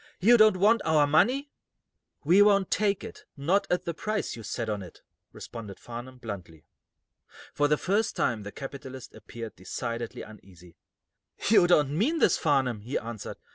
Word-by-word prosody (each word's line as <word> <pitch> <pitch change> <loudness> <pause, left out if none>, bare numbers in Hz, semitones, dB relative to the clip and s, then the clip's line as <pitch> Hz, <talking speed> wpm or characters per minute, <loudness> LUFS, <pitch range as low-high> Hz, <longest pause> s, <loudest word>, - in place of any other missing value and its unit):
"You 235 +6 +6
don't 215 -4 +6
want 215 +4 +4
our 155 -2 +3
money?" 245 - +2 0.7
"We 175 +7 +5
won't 200 -2 +4
take 205 -2 +1
it - - -10
not 170 +9 +1
at 180 - 0
the 170 - -2
price 215 +5 -3
you 115 - -9
set 110 +1 -4
on 105 -2 -2
it," 90 - -13 0.3
responded 105 -4 -9
Farnum, 120 +2 -9
bluntly. 90 -9 -9 0.9
For 145 - +2
the 150 +1 +2
first 205 +7 0
time 115 -3 0
the 105 0 -8
capitalist 135 -1 -9
appeared 110 +1 -9
decidedly 115 +5 -5
uneasy. 90 -5 -15 0.7
"You 200 -5 +6
don't 150 -5 +3
mean 265 - +1
this, - - +3
Farnum," 135 -8 +1
he 120 +6 -3
answered. 115 -2 -7
140 Hz, 160 wpm, -27 LUFS, -, 0.9 s, You